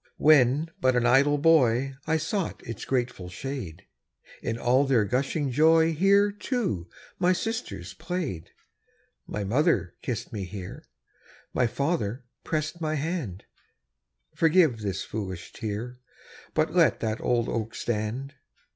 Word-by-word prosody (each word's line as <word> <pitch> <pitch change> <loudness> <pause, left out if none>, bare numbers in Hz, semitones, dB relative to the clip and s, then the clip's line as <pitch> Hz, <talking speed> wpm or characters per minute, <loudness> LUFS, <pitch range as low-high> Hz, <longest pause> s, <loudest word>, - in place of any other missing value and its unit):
When 150 +1 +4
but 130 -1 +3
an 125 -1 +2
idle 140 +4 +4
boy, 135 -4 +3
I 160 0 +2
sought 170 +4 -3
its 115 -3 -6
grateful 120 -8 -2
shade; 115 - -6 0.6
In 115 - -2
all 125 +3 +3
their 130 -6 +3
gushing 135 +5 -1
joy 160 +4 +4
Here, 200 +5 +4
too, 200 - -2 0.3
my 180 0 +4
sisters 225 +6 -4
played. 160 - -4 0.8
My 105 - -3
mother 115 - +1
kissed 120 -1 -4
me 100 -3 -3
here; 90 0 -8 0.7
My 125 - +2
father 135 -3 -2 0.2
pressed 155 +2 -2
my 155 -1 0
hand 145 - -3 0.9
Forgive 160 -7 +4
this 100 -3 -3
foolish 95 -5 -6
tear, 115 +4 -5 0.6
But - - +1
let - - +4
that 110 0 -2
old 120 -2 +1
oak 115 -1 -3
stand. 120 +5 -3
130 Hz, 130 wpm, -27 LUFS, 110-160 Hz, 0.9 s, When